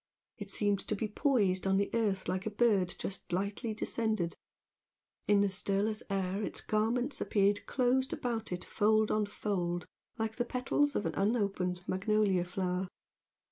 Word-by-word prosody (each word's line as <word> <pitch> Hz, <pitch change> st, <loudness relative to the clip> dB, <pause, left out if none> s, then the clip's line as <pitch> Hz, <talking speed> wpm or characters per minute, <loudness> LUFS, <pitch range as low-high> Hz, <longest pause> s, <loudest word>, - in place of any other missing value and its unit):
It 205 Hz, -1 st, -6 dB
seemed 205 Hz, 0 st, +1 dB
to 215 Hz, -, 0 dB
be 215 Hz, +2 st, -2 dB
poised 205 Hz, -6 st, +1 dB
on 195 Hz, 0 st, +3 dB
the 200 Hz, 0 st, 0 dB
earth 205 Hz, -5 st, 0 dB
like 185 Hz, +3 st, -1 dB
a -, -, +1 dB
bird 205 Hz, -5 st, +2 dB
just 195 Hz, -, -6 dB
lightly 200 Hz, +5 st, -2 dB
descended; 215 Hz, -5 st, -1 dB, 0.9 s
in 205 Hz, -1 st, +5 dB
the 200 Hz, -, +4 dB
stirless 200 Hz, +2 st, 0 dB
air 195 Hz, 0 st, -1 dB
its -, -, -1 dB
garments 235 Hz, +6 st, 0 dB
appeared 200 Hz, 0 st, +2 dB
closed 260 Hz, +1 st, +2 dB
about 230 Hz, -4 st, -3 dB
it 180 Hz, 0 st, -4 dB
fold 215 Hz, 0 st, +2 dB
on 215 Hz, -1 st, +1 dB
fold 175 Hz, -5 st, -2 dB, 0.3 s
like 220 Hz, -1 st, -2 dB
the 240 Hz, -, +2 dB
petals 265 Hz, +4 st, +1 dB
of -, -, 0 dB
an -, -, -1 dB
unopened 195 Hz, -4 st, 0 dB
magnolia 195 Hz, -1 st, +2 dB
flower. 180 Hz, 0 st, -2 dB
205 Hz, 155 wpm, -32 LUFS, 190-220 Hz, 0.9 s, in